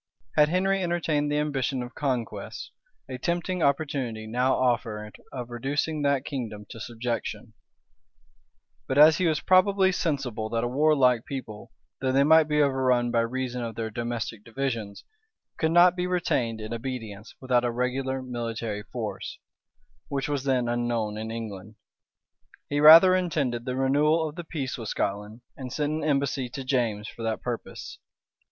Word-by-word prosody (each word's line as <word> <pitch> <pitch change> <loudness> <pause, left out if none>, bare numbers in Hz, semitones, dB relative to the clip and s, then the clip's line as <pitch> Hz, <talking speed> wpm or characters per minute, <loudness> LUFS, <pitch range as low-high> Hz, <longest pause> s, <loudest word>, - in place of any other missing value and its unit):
Had 150 -1 +5
Henry 190 +3 +1
entertained 160 -4 0
the 150 - +1
ambition 135 -3 -1
of 120 - -9
conquests, 130 -5 -3 0.4
a 130 -1 -6
tempting 175 +3 -1
opportunity 140 -7 0
now 125 +4 +1
offered 110 -4 -1 0.2
of 125 -2 -6
reducing 145 +5 -2
that 140 -1 +1
kingdom 110 -7 -5
to 115 - -9
subjection; 120 +1 -4 1.3
but 130 - -1
as 155 +2 +7
he 180 - +2
was 155 -2 +1
probably 190 +1 +4
sensible 135 - -2
that 115 0 -1
a - - 0
warlike 130 -3 +3
people, 115 -6 -7 0.3
though 130 0 0
they 135 +1 +4
might 160 +1 +6
be 150 -1 +3
overrun 130 -3 +2
by 120 - +2
reason 125 +1 -2
of 115 -1 -5
their 110 -1 -4
domestic 115 -1 -4
divisions, 115 -4 -4 0.6
could 160 - +2
not 175 +1 +6
be 180 0 -1
retained 125 -11 0
in 110 +1 -6
obedience 115 -3 -6
without 125 -2 +1
a 120 - +1
regular 130 +2 -2
military 115 -4 -4
force, - - -6 0.7
which 140 -1 -2
was 145 -2 -2
then 130 -3 +1
unknown 120 -3 -1
in 110 +1 -5
England, 110 -2 -7 0.9
he 145 - 0
rather 165 +5 +9
intended 145 -10 0
the 125 -1 -2
renewal 150 +4 +2
of 150 - -7
the 175 +2 -7
peace 140 -6 -4
with 115 - -5
Scotland, 105 +3 -3
and 130 -2 -7
sent 150 +2 -1
an 155 0 -3
embassy 140 -3 0
to 135 +2 -6
James 120 -5 -1
for - - -10
that 110 -1 -2
purpose. 120 -2 -6
130 Hz, 160 wpm, -26 LUFS, 115-150 Hz, 1.3 s, rather